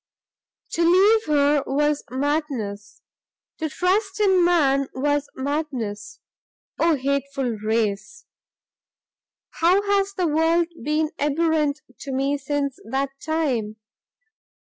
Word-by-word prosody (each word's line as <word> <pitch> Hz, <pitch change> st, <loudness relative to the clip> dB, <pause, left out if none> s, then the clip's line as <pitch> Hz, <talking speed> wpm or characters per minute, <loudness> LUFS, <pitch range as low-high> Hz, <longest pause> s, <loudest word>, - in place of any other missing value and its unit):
"To 335 Hz, -, -1 dB
leave 395 Hz, +6 st, +5 dB
her 290 Hz, -1 st, +3 dB
was 295 Hz, +2 st, +1 dB
madness, 255 Hz, -7 st, -3 dB, 0.6 s
to 315 Hz, -1 st, -2 dB
trust 385 Hz, +6 st, 0 dB
in 380 Hz, -4 st, +4 dB
man 275 Hz, -6 st, +3 dB
was 290 Hz, +2 st, 0 dB
madness, 260 Hz, -8 st, -4 dB, 0.6 s
Oh 330 Hz, -1 st, +3 dB
hateful 275 Hz, -1 st, -1 dB
race! 215 Hz, -, -2 dB, 1.3 s
how 360 Hz, +5 st, +4 dB
has 400 Hz, -1 st, +1 dB
the 365 Hz, -, 0 dB
world 325 Hz, +2 st, +2 dB
been 305 Hz, +2 st, 0 dB
abhorrent 300 Hz, 0 st, +1 dB, 0.2 s
to 275 Hz, -, -6 dB
me 275 Hz, +2 st, 0 dB
since 280 Hz, 0 st, -2 dB
that 270 Hz, +4 st, -2 dB
time! 265 Hz, -10 st, -1 dB
290 Hz, 100 wpm, -23 LUFS, 270-330 Hz, 1.3 s, leave